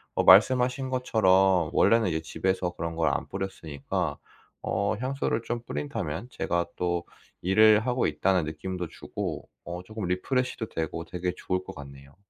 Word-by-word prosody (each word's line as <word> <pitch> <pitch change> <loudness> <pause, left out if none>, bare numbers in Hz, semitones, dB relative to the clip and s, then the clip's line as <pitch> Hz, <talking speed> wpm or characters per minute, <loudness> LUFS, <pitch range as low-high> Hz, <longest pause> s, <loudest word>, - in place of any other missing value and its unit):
어 - - +2
말씀하신 125 +6 +5
것처럼 95 -9 +3
원래는 115 -2 +4
이제 80 -3 0
집에서 90 +3 -1
그런 85 -1 -5
걸 80 -2 +2
안 - - -3
뿌렸으니까 85 -7 -4 0.5
어 100 +2 0
향수를 130 -3 -1
좀 120 0 -3
뿌린다면 75 - -4
제가 85 0 -1
또 85 -1 -1 0.4
일을 105 +3 +6
하고 125 -1 +1
있다는 85 +3 +1
느낌도 90 +3 -4
주고 - - -6 0.2
어 90 +1 -6
쪼끔 110 +1 -6
refresh도 110 +6 -1
되고 80 +1 -4
되게 90 +1 -3
좋을 90 0 -2
것 95 - -9
같네요. 70 -1 -12
95 Hz, 340 characters per minute, -27 LUFS, 85-110 Hz, 0.5 s, 일을